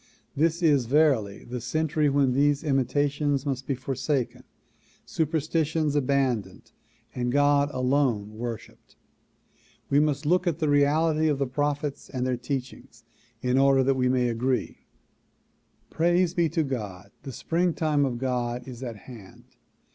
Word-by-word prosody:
This 165 +4 +1
is 145 -7 +3
verily 130 -8 +2
the 125 0 -6
century 155 +2 0
when 140 -2 +2
these 145 +2 +2
imitations 145 0 0
must 135 -2 -3
be 135 - 0
forsaken, 130 -1 -2 0.6
superstitions 160 -1 -1
abandoned 130 -8 -1 0.4
and 125 -1 -2
God 145 +1 +3
alone 125 -5 0
worshiped. 115 -1 -8 1.0
We 140 - +5
must 150 -1 0
look 180 +4 +2
at 165 -3 0
the 155 -3 0
reality 155 +2 +3
of 150 -2 +1
the 140 - 0
prophets 145 +2 -3
and 130 -2 -3
their 130 -1 0
teachings 130 +1 -6 0.4
in 125 +1 +2
order 135 -1 +4
that 135 +1 +2
we 125 -1 +1
may 125 -1 +2
agree. 120 0 -2 1.0
Praise 175 +1 +2
be 170 -3 +1
to 160 - 0
God! 105 -9 -6
the 135 - -7
springtime 160 0 0
of 130 -3 -1
God 125 -1 -2
is 125 -1 -9
at 120 -3 -5
hand. 105 -2 -13
140 Hz, 140 wpm, -26 LUFS, 125-150 Hz, 1.0 s, We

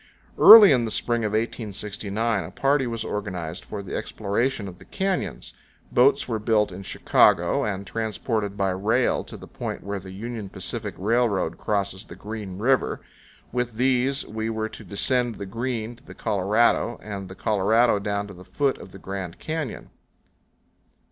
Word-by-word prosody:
Early 220 -5 +11
in 125 -3 +3
the 115 - -2
spring 115 +1 0
of 105 -1 -1
1869 110 -1 -2
a - - -8
party 135 -1 +1
was 115 -1 -3
organized 90 -5 -4
for 100 -2 -6
the 95 - -6
exploration 110 +2 -1
of 90 -1 -10
the 95 - -15
canyons. 195 -1 -3 0.4
Boats 130 +3 +4
were 115 -3 -2
built 105 -1 +2
in 90 +2 -8
Chicago 95 - +3
and 100 -1 -3
transported 110 0 -2
by 95 -2 +1
rail 110 +7 +1
to - - -10
the - - -11
point - - -6
where 100 +1 -4
the 95 0 -11
Union 105 +1 -6
Pacific 100 +1 -5
Railroad 110 0 +1
crosses 100 -2 -2
the - - -11
Green 105 -3 -7
River. 130 +6 +1 0.5
With 125 -1 -1
these 130 +2 +1
we 110 +1 -4
were 110 -1 -2
to - - -11
descend 120 +3 0
the 100 - -6
Green 115 +2 -3
to 115 - -22
the - - -12
Colorado, 105 +4 +1
and 100 -3 -6
the 95 - -9
Colorado 110 +3 +3
down 100 0 -2
to 100 - -10
the 90 0 -12
foot 140 +6 -1
of 95 - -12
the - - -9
Grand 95 -2 -6
Canyon. 155 -6 -5
110 Hz, 170 wpm, -25 LUFS, 100-120 Hz, 0.5 s, Early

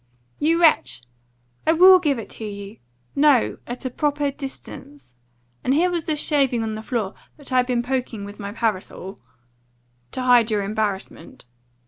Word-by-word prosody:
"You 325 +3 +2
wretch! 315 - +3 0.6
I 320 - +5
will 370 +3 +8
GIVE 295 -6 +1
it 225 - -7
to - - -8
you! 200 0 -7 0.4
No, 280 -4 +3
at 245 +2 -6
a 255 - -2
proper 290 +1 0
distance. 275 - -10 0.5
And 265 - +2
here 355 +4 +3
was 340 -3 -3
this 305 -2 -1
shaving 270 -7 +1
on 220 -1 -3
the 215 - -5
floor, 220 -4 -3 0.2
that 285 -3 -10
I'd 250 -1 +3
been 245 -2 0
poking 245 -5 -3
with 205 +1 -10
my 200 -1 -5
parasol 205 -3 -3 0.5
" 120 0 -42
"To 255 - -3
hide 245 -2 +5
your 210 -2 0
embarrassment." 200 -7 -4
245 Hz, 165 wpm, -22 LUFS, 205-290 Hz, 0.6 s, will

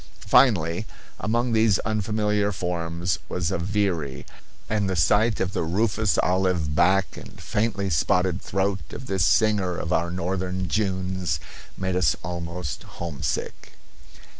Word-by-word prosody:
Finally, 90 -4 +4 0.3
among 120 +3 0
these 110 -3 +4
unfamiliar 105 -1 0
forms 85 -3 -2
was 85 -2 -1
a - - -1
veery, 85 -7 -1 0.4
and 105 -3 0
the 95 - 0
sight 105 +6 +3
of 95 +1 -1
the - - -1
rufous 100 +4 +1
olive 90 -5 +1
back 90 +2 +3
and - - -11
faintly 105 -2 -1
spotted 90 +3 +1
throat 95 0 0
of - - -7
this 95 -6 0
singer 100 -4 +3
of 85 - -2
our 85 +1 +1
northern 90 +1 -2
Junes 95 -4 -1 0.4
made 95 -1 -1
us 90 +1 +3
almost 85 -3 -4 0.2
homesick. 85 -5 -4
95 Hz, 130 wpm, -25 LUFS, 85-105 Hz, 0.4 s, Finally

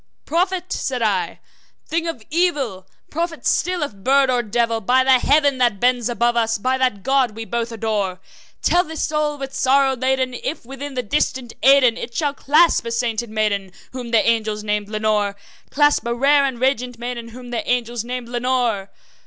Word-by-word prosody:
`Prophet!' 365 +2 -1
said 255 -3 -2
I, 200 -4 -1 0.5
`thing 330 +1 -1
of 250 -9 -7
evil! 285 - 0 0.2
prophet 330 +1 -3
still, 360 -2 +1
if 285 - -4
bird 265 +7 +2
or 245 -1 +2
devil! 230 +1 0
By 255 +5 +3
that 260 -1 +4
Heaven 285 -2 +3
that 240 -6 +2
bends 245 0 +2
above 240 0 +1
us 225 -1 +1
by 255 +5 0
that 250 -7 0
God 265 -4 +1
we 225 0 -6
both 235 0 -3
adore 210 -5 -2 0.4
Tell 355 +1 +3
this 320 -3 -5
soul 300 -1 -1
with 270 -1 -6
sorrow 270 0 +3
laden 260 0 0
if, 255 +2 -5
within 270 +2 -7
the 250 - -1
distant 255 0 -1
Aidenn, 265 -3 +5
It 235 - -7
shall 290 -3 0
clasp 305 +4 +3
a - - -3
sainted 230 -1 -1
maiden 205 -3 -1 0.2
whom 250 -2 -6
the 230 -2 +3
angels 215 -2 0
name 210 -1 -1
Lenore 210 -1 0 0.3
Clasp 290 0 +3
a 235 - -1
rare 280 +3 +4
and 260 -3 -3
radiant 250 -2 0
maiden, 240 0 -5
whom 245 +1 -11
the 235 - -1
angels 240 -2 -1
name 250 0 -5
Lenore?' 240 -4 -1
245 Hz, 180 wpm, -20 LUFS, 225-275 Hz, 0.5 s, Aidenn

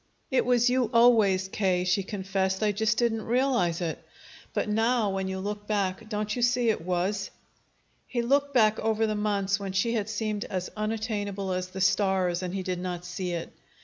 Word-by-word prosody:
"It 260 - +2
was 245 -1 +4
you 250 -2 +2
always, 220 -6 +5
K.," 185 -2 0
she 180 +2 +2
confessed. 190 0 -2
"I 210 - +3
just 220 +1 0
didn't 230 -2 +1
realize 235 -9 +1
it. 165 -2 -3 0.5
But - - -1
now, 225 0 +2
when 190 0 -2
you 190 0 -3
look 205 +1 -5
back, 205 +1 -1
don't 210 -1 -2
you 245 - -3
see 245 -1 +3
it 210 - -3
was?" 185 +3 -1 0.8
He 240 -2 -1
looked 280 +3 +2
back 220 -5 +4
over 220 0 +1
the 215 - 0
months 205 -1 0
when 195 -1 -5
she 215 +5 +1
had 215 -2 -1
seemed 215 -1 -2
as 185 -2 -4
unattainable 210 -3 -2
as 180 0 -2
the 190 +1 -6
stars, 190 -2 +2
and 185 0 -4
he 190 - -2
did 180 -1 -3
not 180 -1 -4
see 180 0 -4
it. 170 -1 -5
205 Hz, 190 wpm, -27 LUFS, 190-225 Hz, 0.8 s, always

